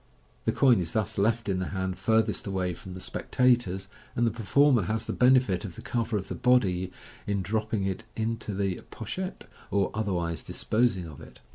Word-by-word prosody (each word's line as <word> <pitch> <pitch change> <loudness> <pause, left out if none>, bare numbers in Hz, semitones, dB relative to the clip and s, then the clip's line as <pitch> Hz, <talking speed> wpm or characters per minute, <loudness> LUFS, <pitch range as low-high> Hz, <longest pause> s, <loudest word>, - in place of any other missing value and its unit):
The - - +3
coin 125 -6 +5
is 85 -2 -2
thus 110 -2 -1
left 115 +2 +1
in 95 -2 0
the 95 - -2
hand 95 +3 -2
farthest 110 +3 +1
away 95 -2 -1
from 90 +2 -9
the - - -7
spectators, 120 -4 +1 0.3
and 120 - +2
the 115 - +2
performer 120 +4 +3
has 110 +4 -1
the - - -2
benefit 125 -8 +4
of 90 -5 -7
the - - -10
cover 115 -2 -1
of 95 -1 -5
the - - -4
body 95 -8 +2 0.4
in 100 -2 0
dropping 110 0 -1
it 95 +3 -2
into 115 0 -2
the 95 -2 -1
pochette, 185 - -5 0.2
or 100 -1 +1
otherwise 90 -7 -1
disposing 110 -5 0
of 75 -4 -10
it. - - -13
105 Hz, 185 wpm, -28 LUFS, 95-115 Hz, 0.4 s, coin